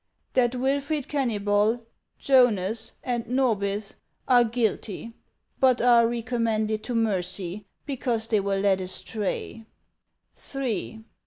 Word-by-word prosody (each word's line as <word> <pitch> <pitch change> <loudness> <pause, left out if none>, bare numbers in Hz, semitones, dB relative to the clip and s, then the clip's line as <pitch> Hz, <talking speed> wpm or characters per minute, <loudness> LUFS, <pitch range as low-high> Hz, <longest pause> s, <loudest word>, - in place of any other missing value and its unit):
That 250 -1 +2
Wilfred 280 +3 -1
Kennybol, 220 -3 +1 0.3
Jonas, 230 -6 +2
and 240 -2 -1
Norbith 210 -5 0 0.3
are 245 -2 +6
guilty, 230 -1 -2 0.5
but 260 -2 +4
are 235 -1 +5
recommended 225 -2 -1
to 245 - -3
mercy, 195 -2 -2 0.2
because 245 -5 -1
they 220 -2 +2
were 200 0 -1
led 195 -1 +2
astray; 205 +4 -4 0.4
" - - -14
III. 225 -4 -3
230 Hz, 105 wpm, -26 LUFS, 205-250 Hz, 0.5 s, are